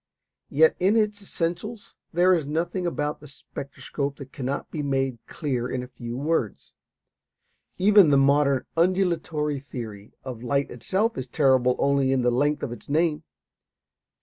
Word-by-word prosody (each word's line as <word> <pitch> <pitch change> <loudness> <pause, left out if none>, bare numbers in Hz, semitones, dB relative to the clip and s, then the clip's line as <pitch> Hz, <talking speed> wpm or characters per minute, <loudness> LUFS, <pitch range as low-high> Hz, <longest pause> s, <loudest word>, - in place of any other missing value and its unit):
Yet 160 +3 +4
in 195 +4 +3
its 210 -2 +1
essentials 195 +4 -4 0.2
there 180 +2 +4
is 165 -4 +1
nothing 170 +5 -2
about 150 -3 -2
the 150 - -13
spectroscope 140 0 -6
that 135 -1 -10
cannot 135 +1 -4
be 155 - -3
made 135 -3 -1
clear 125 -6 -2
in 125 -1 -3
a - - -8
few 120 -1 -7
words. 145 - -2 1.0
Even 200 -3 +6
the 140 - +5
modern 140 0 +3
"undulatory 165 -4 +1
theory" 115 -7 -8
of 125 -4 -7
light 140 +3 0
itself 195 - -1
is 130 - -5
terrible 130 -2 +3
only 140 -1 +2
in 130 -2 +2
the 125 - +3
length 145 +4 +1
of - - -3
its 120 - -10
name. 155 0 +1
145 Hz, 150 wpm, -25 LUFS, 130-170 Hz, 1.0 s, Even